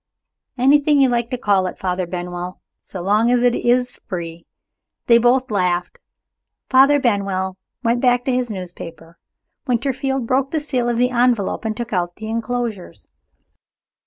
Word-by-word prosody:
"Anything 285 +3 +4
you 270 -1 +5
like 235 -1 0
to 250 - -3
call 200 -5 +1
it, - - -7
Father 180 -1 -2
Benwell, 180 0 -5 0.2
so 185 -3 -8
long 210 +5 +2
as 245 0 +2
it 245 -1 +4
is 245 +1 +1
free." 170 -2 -6 0.6
They 235 -1 +6
both 250 +1 +2
laughed. 180 -3 -1 0.7
Father 275 +2 +6
Benwell 195 -6 -1 0.3
went 235 +1 +1
back 245 -1 +2
to 260 - 0
his 250 -1 0
newspaper. 170 -4 -9 0.5
Winterfield 265 +1 -1
broke 260 +3 +1
the 315 - -1
seal 255 -5 -1
of 240 - -1
the 250 +1 +2
envelope 240 -4 +1
and 220 -1 -2
took 240 -2 -5
out 175 -1 -1
the 220 0 -7
inclosures. 230 -3 -4
235 Hz, 155 wpm, -20 LUFS, 185-250 Hz, 0.7 s, They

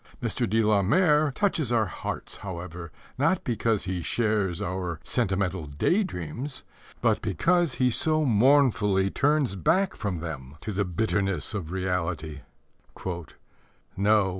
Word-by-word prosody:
Mr. - - -1
de 110 +2 +2
la 105 -2 +3
Mare 150 - +3
touches 165 - 0
our 115 -2 +3
hearts, 95 - -5
however, 90 -3 -7 0.3
not 165 +6 +2
because 115 -3 0
he 95 -2 -3
shares 105 -1 0
our 90 -3 -3
sentimental 95 - 0
day 75 - +1
dreams, 130 - -5 0.4
but - - +2
because 170 - +1
he 125 -1 +2
so 155 +5 +2
mournfully 110 -6 +3
turns 145 -7 +2
back 185 - +2
from 100 -4 -3
them 75 -5 -7
to 110 - -5
the 100 0 0
bitterness 95 -1 0
of 90 -6 -4
reality: 85 -5 -2 0.7
No, 85 -3 -3 0.7
no. 100 0 +3
100 Hz, 135 wpm, -27 LUFS, 90-130 Hz, 0.7 s, la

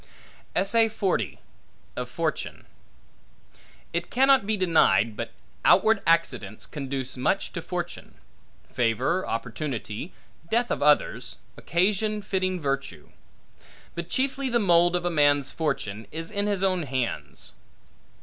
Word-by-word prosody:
Of 225 +4 +3 1.2
Fortune - - -3 1.3
IT - - -2
CANNOT 265 -4 +4
be 215 0 +1
denied, 115 - +3
but - - -5 0.3
outward 210 +2 +5
accidents 165 0 +1
conduce 135 -3 -4
much 125 - 0
to - - -3
fortune; - - -5 0.5
favor, 125 - 0
opportunity, 115 - -4 0.4
death 235 +2 +1
of - - -1
others, 150 0 +2 0.2
occasion 210 +4 +1
fitting 185 -1 -1
virtue. 135 - -3 0.8
But 170 0 -5
chiefly, 270 0 0
the 240 - +2
mould 175 -4 +4
of 175 0 -1
a 175 - +1
man's 145 -3 +3
fortune 115 -9 -3
is 165 +3 -6
in 205 0 0
his 200 -2 0
own 185 -2 +2
hands. 130 -5 -4
170 Hz, 110 wpm, -26 LUFS, 135-200 Hz, 1.3 s, outward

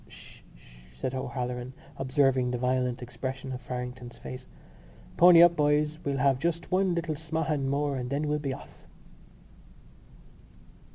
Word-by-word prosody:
"Sh, - - -13 0.2
sh!" - - -19 0.2
said 130 - -3
O'Halloran, 125 -1 -4 0.2
observing 130 -1 +2
the 125 - -1
violent 125 0 0
expression 130 +2 -5
of 125 -1 -5
Farrington's 125 -1 -6
face. 130 0 -9 0.7
"Pony 175 -1 +8
up, 175 0 +6
boys. 150 +1 +1
We'll 140 -1 -1
have 135 -1 +3
just 170 +3 -2
one 185 -1 +2
little 170 -2 -1
smahan 155 -2 -2
more 140 0 0
and 125 -1 -4
then 145 +2 -1
we'll 150 0 0
be 140 -2 -3
off." - - -11
135 Hz, 145 wpm, -28 LUFS, 125-150 Hz, 0.7 s, Pony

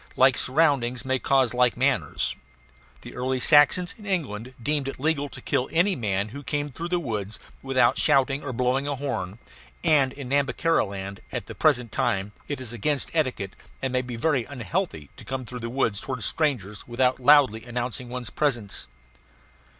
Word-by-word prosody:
Like 130 0 +5
surroundings 130 -4 +1
may 130 0 +1
cause 135 -3 +2
like 125 -1 +3
manners. 135 +1 0 0.7
The - - -10
early 130 +1 -1
Saxons 150 +6 +5
in 210 - -11
England 130 - -2
deemed 145 +2 0
it 135 - -5
legal 145 0 0
to 130 - -10
kill 125 - -1
any 180 +4 +3
man 100 -4 -1
who 140 +6 -8
came 145 +1 -2
through 165 +6 -5
the 175 0 0
woods 110 - -4 0.2
without 130 -3 +2
shouting 135 +1 +3
or 140 - -4
blowing 125 +3 0
a 145 - -1
horn; 125 -8 -4 0.5
and 140 -4 +4
in 135 -2 -8
Nhambiquara 140 +4 +2
land 100 0 -7
at - - -4
the - - -8
present 125 -7 +2
time 95 0 0 0.2
it 145 - -3
is 125 -3 -4
against 135 +6 0
etiquette, 130 - -1 0.2
and 130 -1 -3
may 125 - +2
be 125 -1 -6
very 135 +1 +1
unhealthy, 140 - -3
to - - -11
come 130 -1 -4
through 125 +2 -7
the 115 0 -5
woods 115 -5 0
toward 130 -4 -4
strangers 120 - -1
without 125 +1 +1
loudly 130 -5 +5
announcing 120 0 -4
one's 125 -2 -5
presence. 120 - -1
130 Hz, 175 wpm, -25 LUFS, 120-145 Hz, 0.7 s, Like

